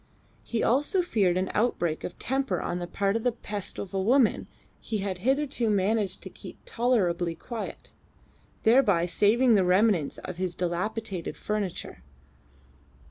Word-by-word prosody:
He 230 - -2
also 295 - +2
feared 195 - +2
an 185 +1 -1
outbreak 175 -8 0
of 175 - -6
temper 270 +1 -1
on 175 - -3
the 175 - -4
part 195 +2 0
of 225 - -1
that 245 -2 -2
pest 205 -2 -4
of 195 - -6
a 190 - 0
woman 240 +3 +3 0.3
he 220 - -3
had 195 -2 -3
hitherto 265 0 +1
managed 205 0 0
to - - -7
keep - - -11
tolerably 180 -9 +1
quiet, 225 +7 -7 0.7
thereby 220 -8 +4
saving 215 +7 +3
the 200 -3 +4
remnants 185 -3 +2
of 185 - -7
his 185 -1 -2
dilapidated 185 +2 -3
furniture. 210 - -4
205 Hz, 145 wpm, -27 LUFS, 180-235 Hz, 0.7 s, thereby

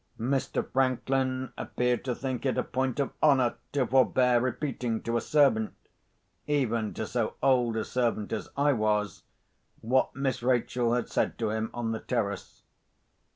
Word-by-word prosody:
Mr. 130 +3 -1
Franklin 130 0 0
appeared 125 -1 -1
to 125 -2 -2
think 130 -3 -4
it 130 - 0
a - - +1
point 130 +1 -2
of 140 - 0
honour 130 -5 +4 0.2
to 140 -3 +1
forbear 125 -1 +3
repeating 125 -3 -2
to 115 - -2
a 120 - +1
servant—even 120 -2 -1
to 110 - -3
so 115 0 -2
old 125 -4 +3
a 110 - -1
servant 115 -4 -1
as - - -4
I 145 0 +3
was—what 110 +3 -2
Miss 135 -2 -1
Rachel 120 -1 +1
had 120 - -1
said - - -1
to 110 -2 -1
him 110 0 -2
on 120 -2 -3
the 110 - -2
terrace. 100 -6 -3
125 Hz, 150 wpm, -28 LUFS, 115-130 Hz, 0.2 s, honour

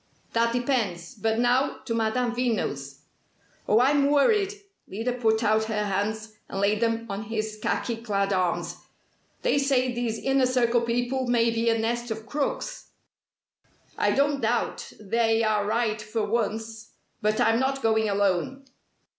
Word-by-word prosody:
That 230 0 +2
depends! 235 -7 -1
But 220 -1 -1
now, 245 +3 +2
to 230 - -2
Madame 230 +2 0
Veno's." 145 - -2 0.7
"Oh, 215 - +4
I'm 280 +2 +4
worried!" 390 +8 +3 0.4
Lyda 225 +6 -2
put 225 -2 +1
out 220 0 +2
her 210 -1 -1
hands, 215 +2 -2 0.2
and 195 - -4
laid 205 +2 +1
them 230 0 0
on 200 +1 -5
his 215 -1 -3
khaki 235 +1 -1
clad 200 -3 -1
arms. 175 -2 -1 0.7
"They - - +2
say 260 -2 +1
these 235 -2 -2
Inner 270 0 +2
Circle 240 -2 +2
people 245 +2 -1
may 235 -1 +3
be 230 0 +1
a 225 - +2
nest 235 +2 -2
of 220 0 -5
crooks!" 300 - -3 1.1
"I - - +1
don't 280 0 +1
doubt 235 +1 -1
'they' 225 +2 +1
are 210 -2 +1
right 220 -1 0
for 215 0 -2
once! 220 0 -3 0.3
But 215 +1 +1
I'm 225 +1 +3
not 270 +1 -1
going 220 -1 +2
alone." 200 +7 0
225 Hz, 150 wpm, -26 LUFS, 215-245 Hz, 1.1 s, Oh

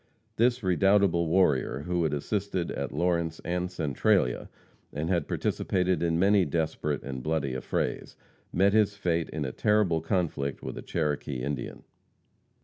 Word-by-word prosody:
This 120 +1 +2
redoubtable 95 -2 +3
warrior, 75 -7 +2
who 90 -1 0
had 80 -3 +1
assisted 95 +4 -2
at - - -4
Lawrence 85 -2 0
and 90 +1 -1
Centralia, 70 -7 +1 0.4
and 80 +5 -2
had 85 -5 0
participated 90 -2 0
in 85 -1 +1
many 100 +2 +4
desperate 75 -2 -2
and 65 -2 -5
bloody 75 -2 -1
affrays, 65 - -3 0.4
met 100 +3 +3
his 105 -2 +3
fate 85 -4 0
in 75 -2 -3
a 65 - -3
terrible 100 -2 +2
conflict 80 -6 -2
with - - -5
a - - -6
Cherokee 75 -5 -2
Indian. 70 +2 -4
85 Hz, 140 wpm, -28 LUFS, 75-95 Hz, 0.4 s, many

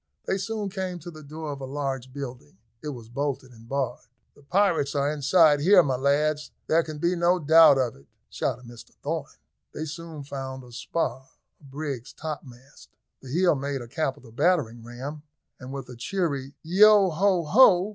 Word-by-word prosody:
They 190 - 0
soon 210 +1 -3
came 185 -2 -3
to 175 +1 -9
the 155 -1 -12
door 155 +1 -6
of 140 -1 -7
a - - -4
large 135 -2 -4
building; 125 - -8 0.2
it - - -7
was 120 -6 -7
bolted 130 +1 -3
and 115 -1 -16
barred. 130 -3 -2 0.3
"The - - -21
pirates 165 -2 +1
are 140 +1 +1
inside 150 +1 +4
here, 180 +4 +6
my 135 -4 0
lads, 150 +3 +1 0.2
there 165 +1 +3
can 155 -2 -7
be 170 +4 +1
no 175 +1 +3
doubt 160 -2 +7
of 130 -3 0
it," 70 +1 -20 0.2
shouted 125 - -2
Mr 120 -1 -13
Thorn. - - -3 0.5
They 155 - -3
soon 160 -1 -7
found 135 -2 -6
a 125 - -14
spar, 130 +2 -3 0.3
a - - -26
brig's 140 -2 -6
topmast. 135 -4 -9 0.3
The 130 - -11
heel 175 +5 +3
made 140 -1 -3
a - - -11
capital 135 -2 -3
battering 135 -5 +1
ram, 130 +6 -7 0.4
and 130 +1 -9
with 135 -2 -6
a 125 - -10
cheery 140 -1 -2
"Yeo, 195 +3 +6
ho, 185 +1 +2
ho!" 185 - +6
145 Hz, 180 wpm, -26 LUFS, 130-170 Hz, 0.5 s, doubt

